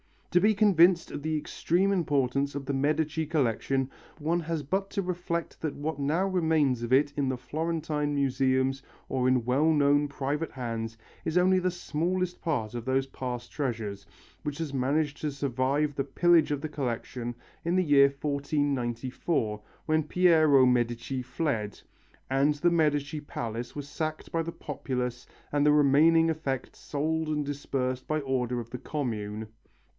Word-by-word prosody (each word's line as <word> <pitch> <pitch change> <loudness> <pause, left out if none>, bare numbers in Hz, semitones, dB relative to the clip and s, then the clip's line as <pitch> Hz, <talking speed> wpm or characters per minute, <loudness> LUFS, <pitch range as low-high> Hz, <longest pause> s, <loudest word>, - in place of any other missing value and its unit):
To 180 - +5
be 215 +3 +4
convinced 180 -4 +4
of - - -5
the 155 +1 -1
extreme 175 +5 0
importance 140 -6 +1
of 140 -1 -4
the 140 - -2
Medici 155 +3 0
collection 135 -2 0 0.3
one 165 +2 0
has 165 -2 -3
but 195 +7 -1
to 200 - -1
reflect 175 -2 -3
that 155 -3 -2
what 150 0 -3
now 155 +7 +1
remains 160 -9 +2
of 120 +2 -1
it 145 +2 +4
in 140 -2 +1
the 130 -1 -1
Florentine 150 0 -2
museums 135 -1 +1 0.3
or 130 -1 +1
in 130 -2 +3
well 140 +6 +3
known 145 -1 +3
private 145 +3 -3
hands 115 -3 -4 0.3
is 160 +2 0
only 185 +1 +4
the 185 0 +1
smallest 180 +1 -2
part 120 -10 -1
of 120 -1 -5
those 135 +1 +1
past 125 -2 -5
treasures, 110 -8 -3 0.3
which 150 -3 -4
has 160 -4 -4
managed 145 +3 0
to 150 - 0
survive 140 +2 0
the 135 - -1
pillage 170 +2 +4
of 145 -1 -1
the 155 - -4
collection 120 -3 -4 0.3
in 170 +1 +1
the 185 - +3
year 140 -3 +6
1494, 140 -4 -1 0.2
when 155 0 +2
Piero 155 -4 +5
Medici 120 +1 0
fled 125 -5 -2 0.5
and 140 +3 +3
the 175 +4 +2
Medici 150 -2 +1
palace 120 -4 -5
was 145 -1 -5
sacked 155 +1 -4
by 165 - +1
the 165 +1 -5
populace 125 -4 -4 0.2
and 145 0 +2
the 150 - +6
remaining 155 +3 +5
effects 140 -5 -3
sold 160 +2 -1
and 150 -1 -1
dispersed 130 -3 -3
by 155 0 0
order 125 -3 -1
of 115 -1 -7
the 125 - -5
Commune. 110 -8 -3
145 Hz, 160 wpm, -28 LUFS, 130-160 Hz, 0.5 s, year